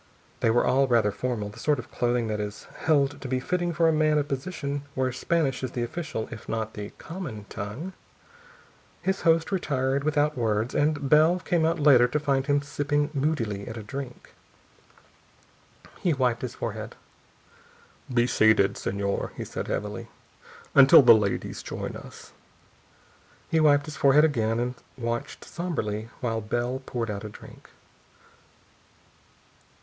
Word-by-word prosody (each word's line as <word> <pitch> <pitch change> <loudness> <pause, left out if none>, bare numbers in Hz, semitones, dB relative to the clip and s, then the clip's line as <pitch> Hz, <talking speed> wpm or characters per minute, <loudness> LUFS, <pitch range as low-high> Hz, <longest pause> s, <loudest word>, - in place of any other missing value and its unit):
They - - +2
were 120 +2 +3
all 135 +1 +3
rather 115 -4 +3
formal, 115 -3 -3
the 110 +3 -12
sort 150 +4 +1
of 125 - -8
clothing 120 -1 0
that 105 -1 -2
is 105 0 -5
held 145 -3 +1
to 135 - -5
be 130 0 0
fitting 175 +5 -1
for 165 0 +2
a 160 - +4
man 155 0 +3
of 145 -1 0
position 140 0 -3
where 130 -1 0
Spanish 135 0 0
is 130 -2 -4
the 120 - -1
official 155 -3 -4
if 115 - -9
not 110 -1 -2
the 105 0 -6
common 155 - -7
tongue. 115 - -6 1.1
His 190 0 0
host 165 +1 +3
retired, 140 -7 0
without 150 0 +1
words, 110 -1 0
and 145 -1 +1
Bell 155 +5 +5
came 175 -3 +1
out 165 +1 0
later 135 -5 +6
to 150 +5 -1
find 140 -2 0
him 145 0 +2
sipping 145 +1 -1
moodily 125 -9 -1
at 115 - -6
a 110 - -6
drink, 135 +2 -8 1.4
waiting - - -32
for - - -20
him. - - -23
He 175 - +2
wiped 125 -3 +1
his 125 - -5
forehead. - - -5 1.2
"Be 120 -1 +3
seated, 110 -4 +3
Señor," 100 0 -2
he - - -5
said - - -5
heavily, - - -4 0.7
"until 140 0 +8
the 125 - +9
ladies 105 -3 -1
join - - -5
us." - - -11 1.2
He 160 - +3
wiped 145 -2 +4
his 155 -2 -8
forehead 145 +3 +5
again 115 -6 0
and 125 +1 -1 0.2
watched 115 -1 -4
somberly 110 -11 -3
while 115 -3 -1
Bell 120 +4 -2
poured 115 -3 -2
out 100 0 -5
a 105 - -6
drink. - - -14
130 Hz, 160 wpm, -26 LUFS, 115-150 Hz, 1.4 s, the